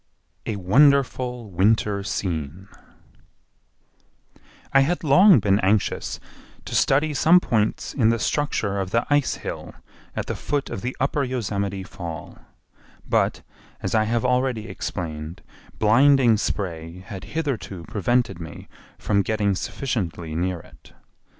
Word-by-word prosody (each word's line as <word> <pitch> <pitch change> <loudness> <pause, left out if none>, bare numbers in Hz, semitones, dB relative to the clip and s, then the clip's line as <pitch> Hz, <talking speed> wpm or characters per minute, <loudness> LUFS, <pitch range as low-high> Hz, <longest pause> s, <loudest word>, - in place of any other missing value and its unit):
A 110 - -1
Wonderful 125 +2 +2
Winter 100 +2 +2
Scene 90 -3 -4 2.1
I 135 - +7
had 165 +7 +1
long 180 +6 +7
been 100 -1 +2
anxious 100 +1 0 0.5
to - - -7
study 150 +3 +2
some 165 +5 +5
points 110 -9 -1
in 115 -5 +3
the 115 - +2
structure 110 -5 -1
of 95 -1 -2
the 115 +4 +1
ice 145 -2 +2
hill - - -7 0.4
at - - -2
the - - -3
foot 145 -1 -2
of - - -4
the 125 +1 -4
Upper 140 +2 0
Yosemite 100 -6 -2
Fall, 85 -5 -8 0.7
but, - - +1 0.4
as - - -2
I 110 -1 +3
have 115 +2 0
already 125 -3 0
explained, 85 -4 -5 0.3
blinding 120 +2 +5
spray 90 -4 -3
had 95 0 -9
hitherto 120 - -3
prevented 120 +2 0
me 80 -1 -9 0.3
from 100 -2 +1
getting 105 0 0
sufficiently 90 - -3
near 90 +1 -2
it. - - -19
110 Hz, 125 wpm, -23 LUFS, 95-130 Hz, 2.1 s, I